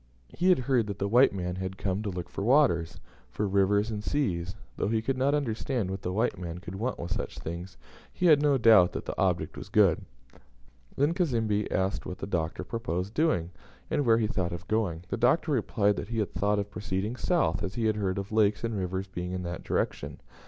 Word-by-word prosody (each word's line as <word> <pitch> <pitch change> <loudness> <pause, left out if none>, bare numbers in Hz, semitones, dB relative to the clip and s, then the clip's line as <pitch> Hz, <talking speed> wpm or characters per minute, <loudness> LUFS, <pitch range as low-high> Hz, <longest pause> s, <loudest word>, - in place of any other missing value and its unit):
He 180 +3 +1
had 185 - +6
heard 125 -3 +1
that 100 -2 -4
the 100 - -1
white 120 +6 +5
man 90 -2 -3
had 95 0 -4
come 95 +1 -1
to 105 - -3
look 90 -2 -5
for 100 - -5
waters, 90 - +3 0.3
for 105 - -2
rivers, 100 +3 +2
and 105 -1 -4
seas; 95 -11 -1 0.2
though - - -1
he 110 +1 +1
could 130 +4 -1
not 135 +3 +2
understand 120 -5 -1
what 95 0 -4
the 90 - -3
white 105 -1 0
man 85 -2 -5
could 90 0 -8
want 115 +6 -2
with 85 - -6
such - - -5
things, 85 +3 -7 0.3
he 180 - -2
had 155 -4 +6
no 145 -2 +3
doubt 110 -7 +6
that - - -5
the - - -4
object - - 0
was - - -8
good. 100 -6 +4 0.9
Then 145 +4 +2
Cazembe 115 - 0
asked 95 +1 -1
what 90 - -5
the - - -5
Doctor 85 -4 -2
proposed 100 -4 -3
doing, 105 - +1 0.4
and 145 - +1
where 115 -3 +4
he 115 - +1
thought 90 -5 -2
of 85 0 -7
going. 95 -7 -1
The - - -2
Doctor 130 +7 +2
replied 105 -5 +1
that - - -4
he 115 - -3
had 105 -3 -1
thought 105 +1 +1
of 100 0 -3
proceeding 105 +3 -3
south, 160 - +1
as 100 -1 -4
he 115 -2 -1
had 110 -1 +1
heard 95 -2 -1
of 100 +1 -4
lakes 105 -1 +2
and 115 -1 -1
rivers 95 0 -2
being 90 -1 -5
in 90 0 -3
that 85 -1 -5
direction. - - -2
105 Hz, 225 wpm, -28 LUFS, 95-115 Hz, 0.9 s, had